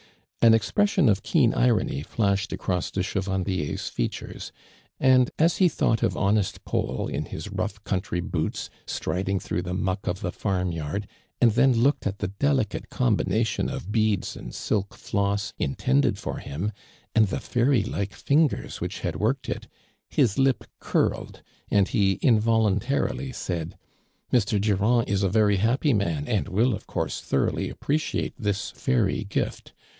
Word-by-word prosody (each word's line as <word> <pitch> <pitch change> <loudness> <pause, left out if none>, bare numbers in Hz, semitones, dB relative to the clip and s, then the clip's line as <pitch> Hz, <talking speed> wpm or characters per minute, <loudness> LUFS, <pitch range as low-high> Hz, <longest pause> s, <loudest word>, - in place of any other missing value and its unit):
An 115 -1 +7
expression 150 - +2
of 105 -2 +3
keen - - +3
irony 60 +3 +2
flashed 100 +3 0
across 90 -3 -2
de 95 - -1
Chevandier's 95 -4 -2
features, - - -4 0.5
and, 130 -2 +5
as 165 +2 +3
he 185 -2 +5
thought 115 -5 +1
of - - +1
honest 100 0 0
Paul 65 - -1
in 75 +2 -3
his - - -7
rough 100 +1 -3
country 95 -2 -2
boots, 80 -2 -3 0.2
striding 95 +1 -1
through 90 - -2
the 90 +1 -4
muck 95 +1 -2
of 90 +2 -2
the 90 - -2
farm 90 -3 -1
yard, 80 +5 -3 0.3
and 120 -2 +5
then 130 +4 +4
looked 120 +1 +2
at 100 0 -3
the 105 - -2
delicate 130 +1 0
combination 115 -3 +1
of 100 - -5
beads 110 -3 +1
and - - -8
silk 100 -2 -1
floss 100 +1 -1
mtended 70 0 +1
for - - -4
him, 85 +10 -3 0.4
and 110 -2 +5
the - - -2
faiiy 120 -3 +1
like 100 -1 -3
fingers 150 0 +1
which - - -4
had - - -2
worked 120 +6 0
it, - - -4 0.4
his 120 -7 +2
lip 135 -3 +3 0.2
curled - - -1 0.3
and 100 -2 +3
he 100 -2 +3
involuntar 110 +1 +3
ily 135 - -5
said: 85 -8 -4 0.6
"Mr. 105 -4 +3
Durand 105 +4 +2
is 100 0 0
a 100 - +2
very 105 0 +3
happy 125 - +2
man 85 -8 0
and 105 -3 0
will, 110 +6 +2
of - - -6
course, - - -2
thoroughly - - 0
api)reciate 155 +2 -1
this 105 -3 -1
fairy 120 -7 0
gift. 100 - -3
105 Hz, 155 wpm, -25 LUFS, 95-120 Hz, 0.6 s, An